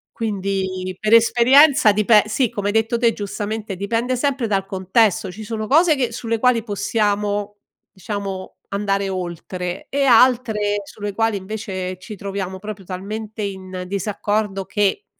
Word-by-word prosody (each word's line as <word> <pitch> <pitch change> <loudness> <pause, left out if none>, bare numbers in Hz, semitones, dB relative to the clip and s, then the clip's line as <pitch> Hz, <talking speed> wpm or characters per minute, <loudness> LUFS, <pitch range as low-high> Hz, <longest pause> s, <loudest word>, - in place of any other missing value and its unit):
Quindi 190 -3 -3
per 215 +1 +1
esperienza 240 +2 +6
dipe 210 +1 +4
sì, 215 +3 0
come 205 0 -3
hai 205 - 0
detto 225 +2 +1
te 230 -1 +3
giustamente, 210 +1 -4
dipende 230 +6 -1
sempre 265 -2 0
dal 195 -2 0
contesto. 195 +1 +1
Ci 215 +4 -9
sono 215 0 -4
cose 315 +4 +5
che 250 -4 -1
sulle 230 0 -2
quali 245 -1 +3
possiamo 205 -1 -1 0.3
diciamo, 195 -1 -6
andare 200 -1 -1
oltre 180 0 -5
e 280 +1 0
altre 225 -4 +3
sulle 205 +1 -6
quali 225 0 +1
invece, 190 -2 -5
ci 210 +3 -9
troviamo 195 -1 -5
proprio 210 -1 -7
talmente 210 +4 -6
in 185 -2 -5
disaccordo 200 0 -2
che 205 - 0
205 Hz, 140 wpm, -21 LUFS, 195-225 Hz, 0.3 s, esperienza